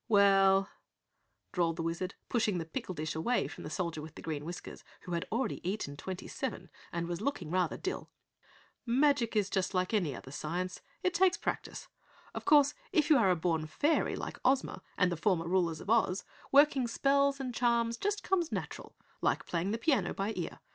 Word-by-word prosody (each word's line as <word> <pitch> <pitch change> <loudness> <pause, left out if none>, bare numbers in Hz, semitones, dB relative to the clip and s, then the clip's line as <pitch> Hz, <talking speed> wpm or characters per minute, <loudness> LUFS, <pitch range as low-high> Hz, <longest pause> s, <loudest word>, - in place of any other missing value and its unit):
"Well 195 -2 +5 0.4
" - - -48
drawled 170 -3 +1
the 165 - -3
Wizard, 170 +3 -3
pushing 215 -5 +1
the 165 - -3
pickle 170 +3 -5
dish 155 0 -3
away 235 +11 0
from - - -9
the - - -5
Soldier 165 -1 -3
with 155 +1 -10
Green 150 -2 -4
Whiskers 175 +2 -7 0.2
who 180 - -6 0.2
already 235 0 0
had - - -14
eaten 185 -8 -2
twenty 185 +5 -6
seven - - -5 0.2
and 170 0 -2
was 175 +2 -3
looking 210 - -2
rather 180 -2 +1
dill. 380 - -4 0.7
"Magic 255 -1 +2
is 205 -2 +1 0.2
like 185 +3 0
any 175 - +1
other 130 - -10
science 180 +5 -3 0.2
it 365 - +2
takes 380 +2 +4
practice. - - -4 0.5
Of - - -6
course, 290 -2 +6 0.2
if 305 -1 +2
you 295 - +8
are 200 -5 +4
a 180 - +4
born 160 -2 0
fairy 295 - +1
like - - -6
Ozma 265 +1 +1 0.2
and 180 -1 +3
the 175 - -2
former 170 -1 +1
rulers 170 -3 +1
of - - -9
Oz, 205 -5 +2 0.3
working 275 -3 +5
spells 280 +3 +2
and 255 -2 -3
charms 235 -1 +2
just 410 - -2
comes 350 -4 +1
natural - - -5 0.3
like - - +1
playing 175 +2 -1
the 220 - 0
piano 230 - +1
by 200 +3 -1
ear. 175 - -5
195 Hz, 190 wpm, -32 LUFS, 170-255 Hz, 0.7 s, you